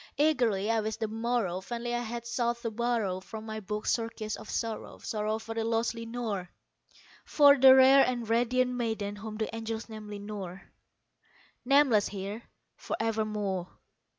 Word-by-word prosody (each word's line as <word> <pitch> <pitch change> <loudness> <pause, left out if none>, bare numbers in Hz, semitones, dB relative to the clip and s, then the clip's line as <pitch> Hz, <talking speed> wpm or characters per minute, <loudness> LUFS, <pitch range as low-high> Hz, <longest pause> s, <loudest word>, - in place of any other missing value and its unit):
Eagerly 240 -9 +2
I 225 - +2
wished 215 +1 -4
the 220 - -1
morrow; 225 -4 -1
vainly 240 +3 -4
I 240 - 0
had 235 0 -5
sought 240 0 -1
to 230 - -2
borrow 225 -5 -1
From 220 +3 -9
my 220 0 -5
books 210 +1 -2
surcease 225 -2 -2
of - - -11
sorrow 225 -2 -3
sorrow 215 0 -2
for 225 0 -7
the 225 0 -1
lost 230 +1 0
Lenore 230 -5 -4 0.7
For 285 -2 +6
the 265 -1 +8
rare 265 +1 +7
and 240 -3 -1
radiant 245 +2 +2
maiden 220 -4 -2
whom 215 +1 -7
the 220 0 -3
angels 225 0 -5
named 215 -1 -8
Lenore 200 -3 -7 1.0
Nameless 270 -6 +4
here 200 +3 -5 0.3
for - - -4
evermore. 210 -5 -1
225 Hz, 155 wpm, -29 LUFS, 210-240 Hz, 1.0 s, the